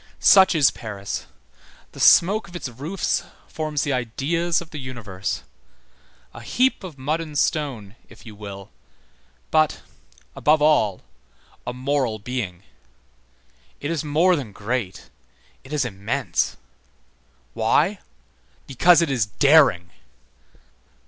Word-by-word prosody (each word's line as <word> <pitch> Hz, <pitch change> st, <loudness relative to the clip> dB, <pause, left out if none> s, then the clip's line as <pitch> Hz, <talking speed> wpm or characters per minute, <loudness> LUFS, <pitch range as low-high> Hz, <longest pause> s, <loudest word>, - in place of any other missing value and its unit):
Such 190 Hz, -2 st, +6 dB
is 140 Hz, -5 st, +5 dB
Paris. 100 Hz, -4 st, -6 dB, 0.6 s
The -, -, -13 dB
smoke 205 Hz, +6 st, +5 dB
of 175 Hz, -, -13 dB
its 175 Hz, -, -4 dB
roofs 145 Hz, +10 st, -2 dB, 0.3 s
forms 155 Hz, -3 st, -3 dB
the 145 Hz, -, -1 dB
ideas 150 Hz, +8 st, -1 dB
of 170 Hz, -2 st, -11 dB
the 150 Hz, -, -6 dB
universe. 110 Hz, -7 st, -5 dB, 0.9 s
A 120 Hz, -, -10 dB
heap 250 Hz, -, +1 dB
of 170 Hz, -6 st, -9 dB
mud 150 Hz, +5 st, -1 dB
and 155 Hz, -3 st, -6 dB
stone, 125 Hz, -10 st, -1 dB
if -, -, -16 dB
you 110 Hz, -, -10 dB
will, 100 Hz, -2 st, -10 dB, 0.8 s
but, 155 Hz, -1 st, +2 dB, 0.5 s
above 155 Hz, +1 st, +3 dB
all, 145 Hz, -10 st, +2 dB, 0.6 s
a -, -, -1 dB
moral 130 Hz, -3 st, -1 dB
being. 105 Hz, -5 st, -5 dB, 1.2 s
It 145 Hz, -, -3 dB
is 160 Hz, -3 st, -2 dB
more 160 Hz, +5 st, +3 dB
than 135 Hz, -9 st, -5 dB
great, 105 Hz, -1 st, -4 dB, 0.5 s
it 130 Hz, -, -14 dB
is 150 Hz, -4 st, 0 dB
immense. 100 Hz, -3 st, -2 dB, 1.0 s
Why? 150 Hz, -, +1 dB, 0.7 s
Because 170 Hz, +6 st, +4 dB
it 155 Hz, -, -1 dB
is 120 Hz, -6 st, 0 dB
daring. 135 Hz, -, +4 dB
140 Hz, 120 wpm, -23 LUFS, 110-160 Hz, 1.2 s, Such